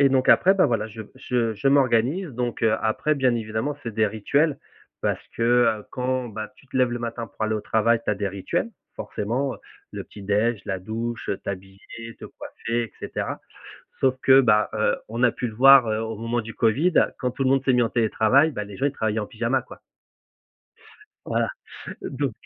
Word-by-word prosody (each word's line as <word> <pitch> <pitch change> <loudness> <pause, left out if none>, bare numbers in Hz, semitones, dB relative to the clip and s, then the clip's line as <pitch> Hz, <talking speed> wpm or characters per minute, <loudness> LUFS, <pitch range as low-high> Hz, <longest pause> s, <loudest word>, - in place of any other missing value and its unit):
et 140 - +6
donc 130 -1 +1
après 190 - +6
bah, 190 - +4
voilà, 115 -2 0
je 110 +1 -8
je 125 -4 -1
je 135 +7 0
m'organise 135 +6 +2
donc 120 -1 -3
heu, 110 -1 +4
après 110 +7 +1
bien 130 -4 +2
évidemment, 110 +5 -3
c'est 115 -3 -6
des 110 0 +3
rituels. 140 +8 0 0.4
Parce - - -2
que, 115 - -2
heu, 115 -3 +3
quand 130 0 -1
bah, 110 0 -6
tu 135 - -21
te 130 - -6
lèves 125 -1 +3
le 120 - -3
matin 115 0 -5
pour 110 - -4
aller 110 0 0
au 105 - -2
travail, 115 +2 +2
tu - - 0
as 105 - 0
des 100 - -2
rituels. 100 - -2 0.3
Forcément, 130 +6 -2
heu, - - -13 0.3
le - - -5
petit 100 - -13
déj, 105 +3 +1
la 95 -2 -3
douche, 115 +4 -5
heu, 100 - 0
t'habiller, 100 +4 -8
te - - -10
coiffer 115 +1 -4
et 110 - -11
cetera. - - -4 0.6
Sauf 130 -1 +3
que 135 0 +7
bah, 105 -3 +3
heu, 110 - +2
on 115 +3 -3
a 120 - +5
pu 125 - -3
le 110 - -8
voir, 135 -1 +8
heu, 110 0 0
au 110 0 -4
moment 115 +2 -2
du 110 0 -9
covid. 145 +11 +2 0.2
Quand 125 -2 -2
tout 135 - -3
le 130 - +2
monde 135 0 +2
s'est 130 - +3
mis 125 - +4
en 115 - +1
télétravail, 120 +6 +3
bah, 105 - -4
les 100 -1 -10
gens 140 - 0
ils 145 - +2
travaillaient 110 -4 -2
en 105 - -3
pyjama, 120 +3 -1
quoi. - - -13 1.5
Voilà. - - 0 0.6
Heu, - - -5
donc - - -2
115 Hz, 215 wpm, -24 LUFS, 110-130 Hz, 1.5 s, voir